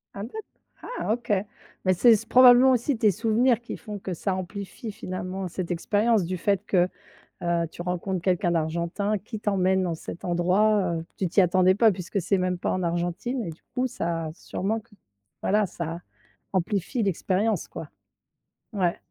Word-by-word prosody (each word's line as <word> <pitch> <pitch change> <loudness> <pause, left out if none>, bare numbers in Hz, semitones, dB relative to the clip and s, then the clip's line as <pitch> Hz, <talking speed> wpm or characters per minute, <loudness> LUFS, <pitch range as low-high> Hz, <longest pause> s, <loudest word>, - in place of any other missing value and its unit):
Ah 200 - -5
d'ac 345 - -7 0.6
ah 215 - +1
OK, 240 -1 -4 0.5
mais 185 - +4
c'est 230 +6 +6
c - - -4
probablement 255 +1 +8
aussi 255 +1 +1
tes 220 -1 +4
souvenirs 230 +4 +2
qui 240 - -7
font 210 -2 -7
que 185 -1 -4
ça 190 +3 -2
amplifie, 200 +4 -6
finalement, 185 -1 -5
cette 180 +1 -4
expérience, 205 +4 +2
du 185 +2 -3
fait 200 +2 0
que, 180 -1 +2 0.5
heu, 170 -1 +1
tu 175 - -9
rencontres 180 +1 -2
quelqu'un 180 -1 +1
d'Argentin 170 +6 -1
qui 215 +2 -8
t'emmène 190 -2 +2
dans 175 -2 -1
cet 165 +1 -8
endroit, 185 +2 +2
heu, 165 0 -4
tu 190 - 0
t'y 185 +4 +4
attendais 185 +1 +4
pas 220 +1 +5
puisque 185 +1 -3
c'est 195 +3 +1
même 180 0 0
pas - - -1
en 185 - -1
Argentine 175 +8 -2
et - - -4
du 160 - -10
coup, 255 +1 0
ça 165 -7 -3
a 155 - -7
sûrement 200 +5 -3
q 210 0 -21 0.5
voilà, 210 +2 +2
ça 170 -2 -5 0.5
amplifie 195 +6 -1
l'expérience, 200 +3 0
quoi. - - -8 0.8
Ouais. 180 -4 +1
190 Hz, 175 wpm, -26 LUFS, 175-215 Hz, 0.8 s, probablement